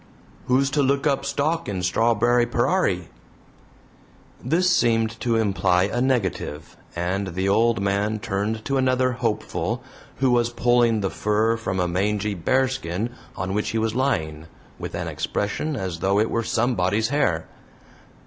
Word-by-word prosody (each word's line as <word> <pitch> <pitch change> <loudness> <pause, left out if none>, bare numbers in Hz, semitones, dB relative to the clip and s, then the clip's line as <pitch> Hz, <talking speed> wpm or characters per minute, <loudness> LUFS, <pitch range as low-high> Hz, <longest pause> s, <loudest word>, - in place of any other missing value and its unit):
"Who's 135 +2 +2
to 145 - +2
look 140 +1 +1
up 140 -2 +1
stock 145 +3 -1
in 95 -3 -3
Strarberry 120 +5 +2
perar 125 +11 +2
ie?" 90 -3 -4 1.3
This 170 +8 +2
seemed 115 -8 +2
to 120 -2 0
imply 100 -4 +2
a 105 +5 -1
negative, 95 - -1 0.2
and 95 +3 -1
the 95 +1 0
old 115 +2 +3
man 100 +2 0
turned 105 +2 -3
to 135 -1 0
another 130 -1 +2
hopeful, 115 -3 -2 0.3
who 130 -1 +2
was 120 -1 +3
pulling 120 -2 +2
the 95 - -1
fur 110 +2 +1
from 95 -5 -3
a 90 - +1
mangy 105 +3 0
bearskin 120 0 -1 0.2
on 95 +1 -3
which 105 +1 -1
he 115 - -2
was 110 0 0
lying, 80 - -1 0.3
with - - -5
an - - -3
expression 145 +9 -2
as 95 -7 -4
though 95 +3 +2
it 110 - +1
were 115 - +1
somebody's 110 -2 0
hair. 130 - +1
110 Hz, 150 wpm, -23 LUFS, 95-125 Hz, 1.3 s, old